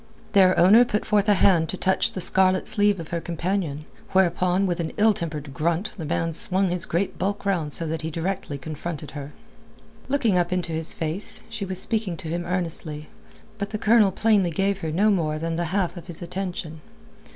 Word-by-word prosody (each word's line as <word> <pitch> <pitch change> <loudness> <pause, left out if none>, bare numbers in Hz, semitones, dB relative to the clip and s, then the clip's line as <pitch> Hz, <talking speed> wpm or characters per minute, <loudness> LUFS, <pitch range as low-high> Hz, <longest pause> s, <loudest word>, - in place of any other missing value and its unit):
Their 185 -2 +5
owner 205 +7 +7
put 210 -3 -2
forth 210 0 +2
a 205 - +6
hand 175 -4 +3
to 190 - -4
touch 190 +1 +1
the 185 - -3
scarlet 185 +1 +3
sleeve 205 -2 +3
of 165 - -7
her 170 -1 -2
companion, 170 -3 -3 0.3
whereupon 180 +1 +2
with 175 -2 -1
an 165 -1 -3
ill 220 +1 +5
tempered 150 -6 -5
grunt 170 +6 -1
the 165 - -6
man 165 +2 -1
swung 185 +3 +1
his 180 -1 -1
great 180 +4 -2
bulk 200 +3 -2
round 170 -7 0
so 165 - +1
that 160 0 -3
he 160 - -3
directly 170 -2 -3
confronted 150 +1 -6
her. 145 -1 -7 0.8
Looking 240 -9 +2
up 175 0 -1
into 180 -2 -1
his 160 0 +1
face, 160 +5 -2
she 220 -3 -4
was 185 -1 -3
speaking 210 -6 -1
to 165 -4 -7
him 170 +1 -3
earnestly, 165 -4 -3 0.5
but 200 0 -3
the 215 - -3
Colonel 215 -2 +4
plainly 205 -3 +2
gave 195 +4 0
her 160 -4 -3
no 205 +7 +3
more 155 -6 0
than 165 +1 -3
the 170 +1 -1
half 185 +1 -1
of 175 0 -10
his 175 0 -7
attention. 175 -3 -5
180 Hz, 200 wpm, -24 LUFS, 165-195 Hz, 0.8 s, owner